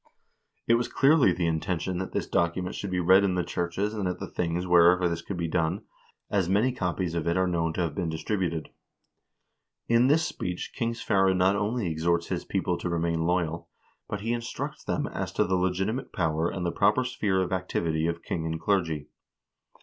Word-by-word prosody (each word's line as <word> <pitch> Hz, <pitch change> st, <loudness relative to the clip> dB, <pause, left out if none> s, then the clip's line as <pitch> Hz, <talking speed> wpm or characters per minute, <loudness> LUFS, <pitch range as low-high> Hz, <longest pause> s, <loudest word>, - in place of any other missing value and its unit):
It 115 Hz, -, +4 dB
was 120 Hz, +1 st, +2 dB
clearly 140 Hz, -, +4 dB
the 85 Hz, 0 st, -1 dB
intention 90 Hz, +2 st, -1 dB
that 95 Hz, -, -4 dB
this -, -, -1 dB
document 90 Hz, +2 st, 0 dB
should 100 Hz, -, -4 dB
be 90 Hz, -1 st, -1 dB
read 95 Hz, +3 st, +5 dB
in 95 Hz, -2 st, +1 dB
the 90 Hz, -, +1 dB
churches 90 Hz, +4 st, -2 dB
and 105 Hz, -4 st, -2 dB
at 90 Hz, 0 st, -2 dB
the -, -, -5 dB
things 85 Hz, +1 st, -2 dB
wherever 90 Hz, 0 st, +5 dB
this 85 Hz, 0 st, -2 dB
could 95 Hz, +2 st, -6 dB
be 85 Hz, -1 st, -1 dB
done, 85 Hz, +3 st, 0 dB, 0.4 s
as 95 Hz, -4 st, 0 dB
many 105 Hz, +7 st, +3 dB
copies 90 Hz, -6 st, -2 dB
of 85 Hz, -1 st, -2 dB
it 85 Hz, +2 st, +1 dB
are 95 Hz, -, +3 dB
known 85 Hz, -2 st, 0 dB
to 90 Hz, -, -2 dB
have 85 Hz, -4 st, -1 dB
been 85 Hz, +1 st, -2 dB
distributed. 85 Hz, 0 st, -2 dB, 1.2 s
In 115 Hz, +2 st, +4 dB
this 160 Hz, +4 st, +3 dB
speech 90 Hz, -, -4 dB
King 115 Hz, -2 st, -2 dB
Sverre 95 Hz, -4 st, +2 dB
not 95 Hz, +2 st, +3 dB
only 105 Hz, +2 st, -1 dB
exhorts 85 Hz, +1 st, 0 dB
his -, -, -2 dB
people -, -, -1 dB
to -, -, -3 dB
remain 85 Hz, -1 st, 0 dB
loyal, 85 Hz, -2 st, -1 dB, 0.4 s
but 105 Hz, -, -3 dB
he 115 Hz, +3 st, -1 dB
instructs 120 Hz, 0 st, -5 dB
them -, -, -1 dB
as -, -, -4 dB
to -, -, +2 dB
the 95 Hz, -, -1 dB
legitimate 95 Hz, +7 st, -1 dB
power 80 Hz, -1 st, 0 dB
and 90 Hz, -2 st, -4 dB
the 85 Hz, -, 0 dB
proper 105 Hz, +8 st, +3 dB
sphere 105 Hz, -6 st, 0 dB
of 95 Hz, 0 st, -1 dB
activity 85 Hz, -3 st, -1 dB
of 85 Hz, 0 st, -3 dB
king 80 Hz, -2 st, -3 dB
and 80 Hz, 0 st, -3 dB
clergy. 80 Hz, -7 st, 0 dB
90 Hz, 200 wpm, -27 LUFS, 85-100 Hz, 1.2 s, read